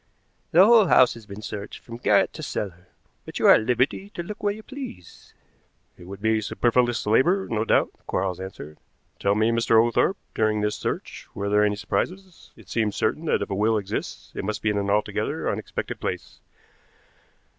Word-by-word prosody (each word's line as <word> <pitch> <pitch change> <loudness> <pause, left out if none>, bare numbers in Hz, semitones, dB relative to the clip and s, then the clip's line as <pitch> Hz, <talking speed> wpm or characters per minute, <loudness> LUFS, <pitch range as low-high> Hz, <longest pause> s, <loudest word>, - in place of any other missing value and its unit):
"The 180 +1 +7
whole 220 -3 +6
house 130 -6 +5
has 115 -3 -13
been 100 +2 -9
searched 105 -1 -6
from 115 -1 -9
garret - - +3
to - - -8
cellar, 95 -3 -5 0.4
but - - -8
you - - 0
are - - +9
at - - +4
liberty 125 - 0
to 175 - -4
look 210 +4 -8
where 205 - +1
you 215 +2 -8
please." 260 - -10 0.6
"It 90 - -14
would 100 +2 -10
be 110 0 +2
superfluous 120 +2 +1
labor, 170 - +3
no 110 -1 -1
doubt," - - +2 0.2
Quarles 95 -1 -1
answered. 80 -5 -9 0.4
"Tell 100 0 +2
me, 110 +2 +2
Mr. 115 -1 +3
Oglethorpe, 120 - +2 0.2
during 110 -1 +1
this 105 0 0
search - - -5
were 100 0 -2
there 105 +1 +4
any 105 0 +2
surprises? 185 - -4
It 110 -5 -17
seems 110 0 -1
certain 160 - -1
that - - +1
if - - -8
a - - 0
will 110 +3 +2
exists 100 -1 -5
it - - -5
must 105 +2 -3
be 110 - +2
in 100 - 0
an 100 0 -2
altogether 105 +1 -1
unexpected - - -4
place. - - -5
110 Hz, 190 wpm, -24 LUFS, 100-130 Hz, 0.6 s, are